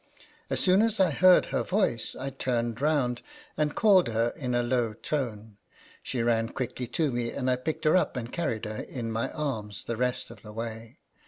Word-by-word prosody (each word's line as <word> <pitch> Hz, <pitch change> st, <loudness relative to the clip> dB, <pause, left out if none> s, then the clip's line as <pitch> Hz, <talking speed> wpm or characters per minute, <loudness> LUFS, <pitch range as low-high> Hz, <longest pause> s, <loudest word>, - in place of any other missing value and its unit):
As -, -, 0 dB
soon 185 Hz, +2 st, +4 dB
as 225 Hz, -1 st, +1 dB
I 185 Hz, -4 st, +4 dB
heard 185 Hz, +5 st, +6 dB
her -, -, -1 dB
voice, 185 Hz, -, 0 dB
I 135 Hz, +1 st, -4 dB
turned 120 Hz, -2 st, -2 dB
round, 140 Hz, -5 st, +1 dB, 0.3 s
and 150 Hz, -1 st, 0 dB
called 195 Hz, -5 st, +5 dB
her 115 Hz, +1 st, 0 dB
in 125 Hz, -6 st, -2 dB
a 120 Hz, -, +2 dB
low 120 Hz, -2 st, 0 dB
tone. 110 Hz, -5 st, -4 dB, 0.4 s
She 120 Hz, -3 st, -2 dB
ran 115 Hz, -1 st, +2 dB
quickly 125 Hz, -1 st, -4 dB
to 145 Hz, +4 st, 0 dB
me, 120 Hz, -1 st, -1 dB
and 130 Hz, 0 st, -1 dB
I -, -, +3 dB
picked 150 Hz, +6 st, -4 dB
her 155 Hz, -, +5 dB
up 170 Hz, -7 st, +2 dB
and 120 Hz, 0 st, -5 dB
carried 120 Hz, -10 st, -2 dB
her 105 Hz, 0 st, -5 dB
in 115 Hz, -3 st, -5 dB
my 115 Hz, +1 st, -1 dB
arms 115 Hz, -9 st, -4 dB
the 115 Hz, -, -4 dB
rest 125 Hz, +1 st, -1 dB
of -, -, -13 dB
the 105 Hz, -1 st, -11 dB
way. 115 Hz, 0 st, -6 dB
125 Hz, 200 wpm, -28 LUFS, 115-150 Hz, 0.4 s, heard